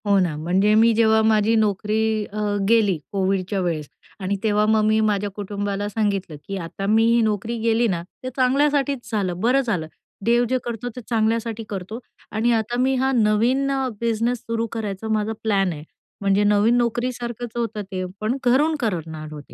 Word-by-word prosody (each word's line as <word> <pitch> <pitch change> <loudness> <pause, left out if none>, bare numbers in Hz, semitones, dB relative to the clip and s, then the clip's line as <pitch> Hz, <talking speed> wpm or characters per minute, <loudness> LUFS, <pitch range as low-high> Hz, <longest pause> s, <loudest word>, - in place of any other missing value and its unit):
हो 200 -1 +4
ना. 175 -5 0
म्हणजे 185 +7 +2
मी 225 +1 +5
जेव्हा 220 0 +4
माझी 220 0 +3
नोकरी 215 0 +1 0.3
अ, 215 - -5 0.3
गेली, 215 -6 +4
कोविडच्या 195 0 0
वेळेस 160 -5 -2 0.3
आणि 195 +1 -1
तेव्हा 210 -1 +2
मग 215 0 +3
मी 215 0 +3
माझ्या 205 0 -1
कुटुंबाला 205 0 -3
सांगितलं, 200 -6 -1
की 195 - -3
आता 185 +2 -5
मी 220 +2 +4
ही 235 +1 +4
नोकरी 220 +2 -1
गेली 230 +1 +2
ना, 175 -5 -1 0.2
ते 255 - -3
चांगल्यासाठीच 275 0 +1
झालं, 185 -5 -1
बरं 250 +4 +3
झालं. 195 -11 -2 0.4
देव 235 +1 +4
जे 260 - +2
करतो 240 0 -4
ते 250 - -6
चांगल्यासाठी 225 0 0
करतो 200 +3 -5 0.3
आणि 225 +3 +1
आता 225 +1 -1
मी 265 +1 +2
हा 265 +1 +1
नवीन 235 +5 +2
अ, 270 -1 0
बिझनेस 230 +1 0
सुरू 230 0 -2
करायचा 215 -2 -4
माझा 215 +1 0
प्लॅन 195 -4 +2
आहे. 150 -1 -9 0.4
म्हणजे 200 +1 +2
नवीन 210 +3 +3
नोकरीसारखंच 240 0 -2
होतं 225 -3 -2
ते 185 -1 -3 0.2
पण 220 +4 0
घरून 290 +6 +3
करणार 160 - -3
होते. 145 -2 -11
220 Hz, 175 wpm, -22 LUFS, 200-235 Hz, 0.4 s, मी